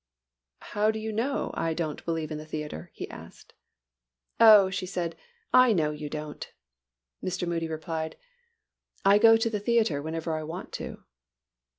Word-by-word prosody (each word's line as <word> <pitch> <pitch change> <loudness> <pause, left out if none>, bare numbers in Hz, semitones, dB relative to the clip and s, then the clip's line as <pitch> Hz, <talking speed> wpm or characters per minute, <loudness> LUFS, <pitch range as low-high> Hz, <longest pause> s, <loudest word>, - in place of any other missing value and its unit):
"How 210 +1 +2
do 220 - 0
you 220 0 -4
know 245 +7 -1
I 165 -1 -1
don't 155 -3 -3
believe 165 -2 -2
in 155 - -4
the 155 - -9
theatre?" 150 - -6
he - - -7
asked. - - -13 0.9
"Oh," 210 -4 +8
she 190 -1 -3
said, 175 -3 -3 0.4
"I 255 -2 +7
know 155 -5 +1
you 150 0 -6
don't." 150 0 -6 0.7
Mr. 180 -1 -2
Moody 165 -1 -1
replied, 160 0 -4 0.9
"I 200 +1 +6
go 225 +1 +7
to 225 0 0
the 210 - -1
theatre 215 -9 +1
whenever 160 +1 -3
I 155 - -2
want 160 +3 -7
to." - - -7
170 Hz, 160 wpm, -28 LUFS, 155-210 Hz, 0.9 s, Oh